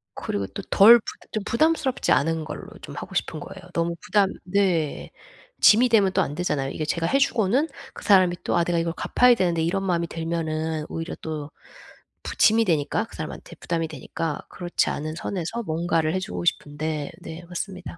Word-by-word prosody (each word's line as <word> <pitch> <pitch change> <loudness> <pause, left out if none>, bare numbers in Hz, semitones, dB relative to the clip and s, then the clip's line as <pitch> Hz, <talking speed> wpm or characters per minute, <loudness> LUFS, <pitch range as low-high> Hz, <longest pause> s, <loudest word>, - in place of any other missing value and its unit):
그리고 100 -1 -3
또 - - -7
덜 230 +4 +8
부 - - -19 0.3
좀 215 -2 -2
부담스럽지 305 0 +1
않은 160 +4 +2
걸로 155 - -7
좀 - - -9
하고 - - -8
싶은 - - -1
거예요. - - -10
너무 170 0 0
부담 200 -2 +3
네. 180 -5 0 0.5
짐이 235 +4 +7
되면 205 -4 +4
또 190 - +3
안 145 - -4
되잖아요. 150 -6 -1
이게 155 - -4
제가 165 +2 -1
해 275 +11 +2
주고는 250 +2 +2 0.3
그 - - -10
사람이 185 -4 +5
또 - - 0
'아 170 - +3
내가 170 0 0
이걸 165 0 -1
갚아야 250 +5 +4
되는데.' 175 -6 +1
이런 190 +4 0
마음이 170 -3 0
들면은 160 -1 -3
오히려 165 +1 -5
또 155 -2 -5 0.7
부 - - -6
짐이 225 +1 +5
되니까 155 -5 0
그 - - -15
사람한테 - - -7
부담이 165 -1 -2
되니까. 155 +1 -5
그렇지 175 -1 -1
않은 155 +1 -4
선에서 190 +6 -4
뭔가를 165 -2 0
해 185 - 0
주고 180 -1 -5
싶은데 150 -1 -2
네 165 +2 -8
맞습니다. 180 0 -6
170 Hz, 380 characters per minute, -24 LUFS, 160-195 Hz, 0.7 s, 덜